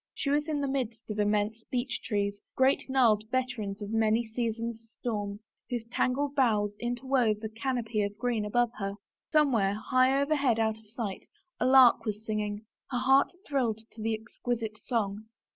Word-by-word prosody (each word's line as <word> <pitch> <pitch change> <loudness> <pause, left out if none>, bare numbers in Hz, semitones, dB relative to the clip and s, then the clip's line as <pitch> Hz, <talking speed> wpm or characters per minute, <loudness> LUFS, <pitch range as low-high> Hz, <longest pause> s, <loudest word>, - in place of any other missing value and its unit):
She 280 - -1
was 295 +1 +1
in 300 -2 -1
the 280 - 0
midst 240 -5 -3
of 210 - -4
immense 210 +2 +1
beech 250 0 -2
trees, 205 -2 -1
great, 265 +1 +2
gnarled 230 -5 +4
veterans 240 -6 -2
of 205 - -6
many 225 +1 +2
season's 230 0 -3 0.2
storms, 205 -3 -3 0.3
whose 240 -3 -3
tangled 275 +3 0
boughs 210 -7 +2
interwove 245 -2 +1
a 220 - -3
can 230 +4 -2
opy 220 -3 -1
of 205 0 -4
green 240 -3 0
above 240 +3 +1
her. 195 0 -3 0.4
Somewhere, 245 -11 +3
high 255 +5 +3
overhead 280 -5 +2
out 220 -1 +1
of 220 - -22
sight, 215 -4 -5 0.3
a 250 - +2
lark 260 -2 +7
was 215 0 -4
singing. 210 -1 -2 0.2
Her 250 - -1
heart 265 +2 +4 0.2
thrilled 240 -6 0
to 220 - -10
the 225 0 0
exquisite 225 -1 -4
song. 215 -3 -2
230 Hz, 170 wpm, -29 LUFS, 215-255 Hz, 0.4 s, lark